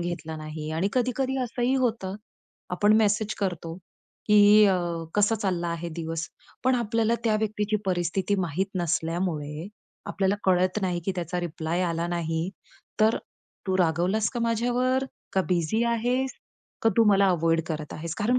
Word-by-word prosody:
घेतला 165 -2 -4
नाही. 155 0 -6
आणि 165 +5 0
कधी-कधी 255 +1 0
असंही 245 +2 0
होतं. 200 -5 -1 0.6
आपण 205 +4 +3
मेसेज 215 0 +2
करतो, 170 -4 -3 0.5
की 210 0 +7
"अ, 190 - +4 0.4
कसा 210 +2 +3
चालला 180 -5 -1
आहे 170 0 -3
दिवस?" 165 -1 -3 0.4
पण 260 0 +4
आपल्याला 230 -1 +1
त्या 215 -2 +3
व्यक्तीची 215 0 -1
परिस्थिती 185 +2 0
माहीत 180 +3 -1
नसल्यामुळे, 165 -1 -2 0.4
आपल्याला 195 0 +1
कळत 185 +1 +3
नाही, 180 -2 0
की 195 - 0
त्याचा 175 +1 -2
रिप्लाय 170 +1 -2
आला 170 -1 -1
नाही, 165 0 -1 0.5
तर 220 +1 +4 0.5
तू 190 0 +1
रागवलास 180 +5 +2
का 240 - -4
माझ्यावर? 245 +3 +1 0.3
का 190 - +2
बिझी 180 +5 +1
आहेस? 245 +3 0 0.5
का 225 - +5
तू 230 - +6
मला 200 -1 +5
अव्हॉइड 165 -1 +2
करत 155 -2 -4
आहेस? 165 +1 -5
कारण 240 +4 +2
190 Hz, 145 wpm, -26 LUFS, 170-220 Hz, 0.6 s, की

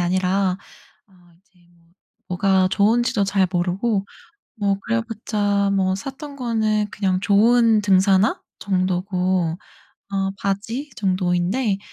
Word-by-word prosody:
아니라 185 +1 +1 0.5
어 195 - -27 0.3
이제 185 -2 -32 0.2
뭐 170 -1 -29 0.4
뭐가 185 +1 +2
좋은 225 +5 +3
지도 205 -4 0
잘 195 -1 +1
모르고 195 +4 0 0.5
뭐 200 -2 0
그래 230 0 -1
봤자 205 -3 -1
뭐 190 -1 +1
샀던 275 +7 -7
거는 220 -4 0
그냥 190 -2 -1
좋은 225 +2 +4
등산화 195 +1 +3 0.2
정도고 185 -2 0 0.5
어 195 0 0
바지 225 +9 -3
정도인데 190 +3 0
195 Hz, 220 characters per minute, -21 LUFS, 185-215 Hz, 0.5 s, 좋은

